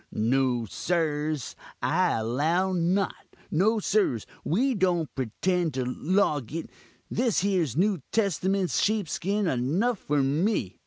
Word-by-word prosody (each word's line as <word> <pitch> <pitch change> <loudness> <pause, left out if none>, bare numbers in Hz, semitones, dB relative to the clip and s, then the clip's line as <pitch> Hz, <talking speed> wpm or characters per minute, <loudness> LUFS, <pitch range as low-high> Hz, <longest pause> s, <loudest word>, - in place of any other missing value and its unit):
No, 125 +1 +1
sirs, 155 - -2 0.2
I 180 +3 +2
allow 155 +12 0
not; 185 +3 -1 0.2
no, 210 +8 +3
sirs, 200 - +1 0.2
we 255 - +1
don't 180 - 0
pretend 160 - -1
to 130 - 0
loguk 155 - -1 0.4
this 235 -5 +1
here 190 -4 +1
new 190 0 +1
testament's 195 -2 +1
sheepskin 205 0 0
enough 175 - 0
for 145 -1 0
me. 145 - 0
175 Hz, 110 wpm, -27 LUFS, 140-195 Hz, 0.4 s, no